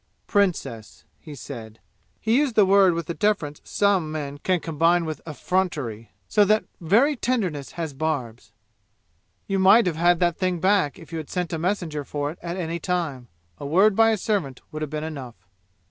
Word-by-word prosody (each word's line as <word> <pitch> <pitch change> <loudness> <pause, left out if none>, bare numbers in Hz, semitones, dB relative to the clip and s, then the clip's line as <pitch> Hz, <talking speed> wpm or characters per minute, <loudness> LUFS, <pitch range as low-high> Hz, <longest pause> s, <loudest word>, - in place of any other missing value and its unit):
"Princess," 120 - -1 0.2
he 150 - -10
said. 115 -5 -9 0.4
He 225 +1 +1
used 285 -6 0
the 210 - +6
word 190 -2 +5
with 170 -1 -3
the 170 - -4
deference 180 -8 -1
some 195 -6 +1
men 145 -2 -5
can 185 +3 +1
combine 165 +2 +2
with 155 -1 -5
effrontery, 150 - -2 0.2
so 210 - +4
that 215 +2 +2
very 230 - +3
tenderness 185 - -2
has 160 -4 -4
barbs. 135 -6 -3 0.9
"You 195 -1 -1
might 200 +5 +6
have 170 -4 -1
had 175 +1 +3
that 175 -2 +1
thing 185 -2 0
back 185 -5 +2
if 165 -3 -14
you 165 - -3
had 155 - -8
sent 180 -2 -3
a 165 - -2
messenger 170 -4 -2
for 145 +1 -3
it 165 - -13
at 175 +1 -5
any 170 -1 -3
time. 160 -9 -2 0.3
A - - -6
word 195 +7 +4
by 225 +1 +5
a 220 - +2
servant 185 - -2
would 155 - -6
have 155 - -3
been 155 0 -4
enough. 140 -7 -7
170 Hz, 185 wpm, -24 LUFS, 145-195 Hz, 0.9 s, the